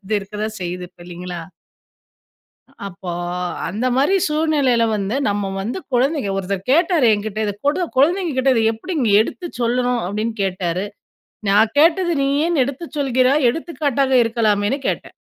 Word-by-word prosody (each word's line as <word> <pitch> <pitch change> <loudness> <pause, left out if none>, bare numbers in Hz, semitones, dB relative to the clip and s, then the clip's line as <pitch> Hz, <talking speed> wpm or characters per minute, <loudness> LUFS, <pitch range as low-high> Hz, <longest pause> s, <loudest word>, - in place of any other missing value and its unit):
இது 215 +3 -2
இருக்கதான் 210 +2 -5
செய்யுது. 180 0 -4
இப்ப - - -26
இல்லீங்களா! 175 0 -7 1.5
அப்போ 175 -1 -7 0.6
அந்தமாரி 255 - +1
சூழ்நிலையில 295 -6 +2
வந்து 200 +3 -2
நம்ம 200 -1 -1
வந்து 230 - -3
குழந்தைக 260 -2 +1
ஒருத்தர் 195 +2 -4
கேட்டாரு 330 -4 +3
எங்கிட்ட, 210 0 -4
"இத 205 - -1
கொடு 340 +5 +1
குழந்தைங்கக்கிட்ட 285 -3 +2
இத 225 - +2
எப்பிடி 230 +12 -6
நீ 210 - +2
எடுத்து 350 +10 -6
சொல்லணும்," 245 +1 +1
அப்பிடின்னு 215 +4 -3
கேட்டாரு. 185 -1 -2 0.6
நான் 215 +5 +3
கேட்டது 345 +3 +4
"நீயேன்னு 285 +2 +2
எடுத்துச் 290 +4 -7
சொல்கிறாய், 260 0 +2
எடுத்துக்காட்டாக 280 -3 -1
இருக்கலாமேன்னு" 220 +1 +1
கேட்டேன். - - -4
245 Hz, 130 wpm, -20 LUFS, 205-290 Hz, 1.5 s, கேட்டது